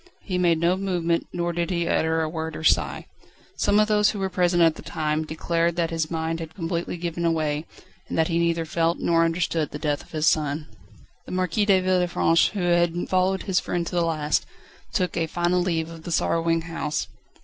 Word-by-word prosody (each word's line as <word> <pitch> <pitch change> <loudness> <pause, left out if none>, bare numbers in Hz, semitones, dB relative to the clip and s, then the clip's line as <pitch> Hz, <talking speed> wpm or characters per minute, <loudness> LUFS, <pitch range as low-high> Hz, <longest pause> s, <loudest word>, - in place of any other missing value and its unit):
He 180 -2 -2
made 170 -2 +3
no 170 +2 +3
movement, 175 -3 -1
nor 175 0 -2
did 170 +1 -1
he 170 -2 -1
utter 160 0 +1
a - - -1
word 160 0 -4
or - - -6
sigh. - - +2 0.5
Some 205 +1 +2
of 215 - +4
those 210 -1 +4
who 210 - -3
were 195 -1 -1
present 175 -1 +3
at 165 -1 +5
the - - -11
time 155 -1 -2
declared 165 +2 0
that 170 -1 0
his 160 -1 -1
mind 165 0 -2
had 160 -1 -8
completely 170 -1 -3
given 170 0 -1
way, 155 0 -2 0.4
and - - -3
that 160 -1 +3
he 170 -1 0
neither 170 -1 +1
felt 165 +1 0
nor 165 -1 +2
understood 165 -2 0
the - - -6
death 150 -1 -1
of - - -21
his 155 -1 -1
son. 150 -1 +1 0.6
The - - -8
Marquis 185 +3 0
de 195 -2 +5
Villefranche, 180 -2 +2
who 200 -4 -2
had 175 0 +1
followed 185 +1 +1
his 190 -2 +1
friend 175 -1 -2
to - - -6
the 175 - +3
last, 155 -3 0 0.4
took 185 -5 -1
a 165 -1 0
final 175 +2 +1
leave 165 -2 -1
of 165 -1 -10
the 170 - -7
sorrowing 165 0 +1
house. 165 -2 -3
170 Hz, 210 wpm, -24 LUFS, 160-175 Hz, 0.6 s, at